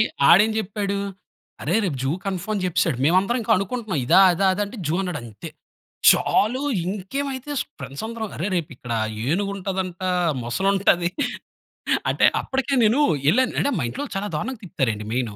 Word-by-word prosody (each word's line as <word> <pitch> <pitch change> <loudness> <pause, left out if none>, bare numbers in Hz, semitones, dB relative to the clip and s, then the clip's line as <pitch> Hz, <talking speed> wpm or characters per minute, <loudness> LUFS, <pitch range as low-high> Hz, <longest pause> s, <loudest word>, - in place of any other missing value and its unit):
ఆడె - - +7 0.3
ఆడెం 210 +5 +7
చెప్పాడు, 200 -1 -2 0.7
"అరే - - +1
రేపు 160 -7 -1
జూ 135 - 0
కన్‌ఫర్మ్" 195 +2 -3
అని 195 - -2
జెప్పేసాడు. 175 -6 +1
మేమందరం 190 - +3
ఇంకా 225 - +1
అనుకుంటున్నాం 200 - -3
ఇదా, 190 - +6
అదా, 195 +3 +1
అదా 205 - -1
అంటే 210 +2 -10
జూ 155 - 0
అన్నాడంతే. 125 - -6 0.6
చాలు, 250 +6 +2 0.2
ఇంకేమైతే 260 +8 -4 0.3
ఫ్రెండ్స్ 140 +10 -7
అందరం, 225 -2 -5
"అరె! 180 +6 -2
రేపు 165 -3 -2
ఇక్కడ 120 -1 -7 0.3
ఏనుగు 195 +7 0
ఉంటదంట, 190 -1 -4 0.4
మొసలి 155 +12 -1
ఉంటది. 175 -3 +2 1.0
అంటే - - +3 0.2
అప్పటికే 270 0 -1
నేను 235 +7 +3 0.3
ఎళ్ళాను 255 +3 +2
అంటే, 285 - +1
మా - - -1
ఇంట్లో 285 - -5
చాలా 205 - -2
దారుణంగా 260 -4 -4
తిప్పుతారండి 115 - -2
మెయిను. 120 -5 -2
195 Hz, 155 wpm, -23 LUFS, 170-220 Hz, 1.0 s, ఆడె